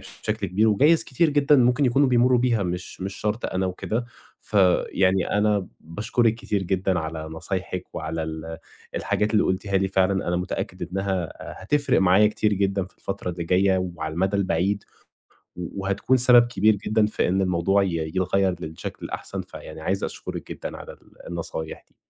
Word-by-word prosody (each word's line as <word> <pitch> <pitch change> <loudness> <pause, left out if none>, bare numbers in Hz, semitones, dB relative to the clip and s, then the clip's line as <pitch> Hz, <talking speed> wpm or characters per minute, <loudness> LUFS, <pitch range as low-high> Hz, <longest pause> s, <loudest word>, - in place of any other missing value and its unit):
بشكل 110 -2 -4
كبير، 105 +5 +2
وجايز 145 +10 +4
كتير 155 +5 +1
جدًا 145 0 +4
ممكن 125 +2 +3
يكونوا 135 +2 +3
بيمرّوا 125 0 +4
بيها، 120 -4 +2
مش 90 +1 -5
مش 95 +1 -4
شرْط 105 +3 -2
أنا 95 0 -1
وكده. 110 +6 -3 0.4
فيعني 95 -1 +2
أنا 105 -2 +2
باشكرِك 110 +7 0
كتير 105 -4 -2
جدًا 95 0 0
على 80 0 -4
نصايحِك 90 +3 -5
وعلى 80 +1 -3
ال 80 0 -6 0.4
الحاجات 105 +1 0
اللي 105 - +4
قُلتيها 95 +1 0
لي، 95 0 +1
فعلًا 95 0 +1
أنا 90 - +1
متأكد 90 - -4
إنها 95 -3 -2 0.3
هتفرِق 145 +5 +2
معايا 95 +3 +5
كتير 105 0 +1
جدًا 100 -1 0
في 95 - -17
الفترة 100 -2 -4
اللي 85 -1 -5
جاية 95 +1 +2
وعلى 80 0 -4
المدى 95 +4 +1
البعيد، 100 +1 0 0.7
وهتكُون 100 +7 -1
سبب 120 -1 +6
كبير 110 -1 +3
جدًا 110 +2 +1
في 105 - 0
إن 95 +2 +1
الموضوع 95 +2 +2
ي - - 0 0.3
يتغيّر 95 0 +1
للشكل 80 -1 -7
الأحسن، - - -5
فيعني - - -10
عايز 95 +4 -1
أشكرِك - - -5
جدًا - - -6
على - - -9
ال - - -17
النصايح 80 -2 -6
دي. - - -36
95 Hz, 165 wpm, -24 LUFS, 90-110 Hz, 0.7 s, سبب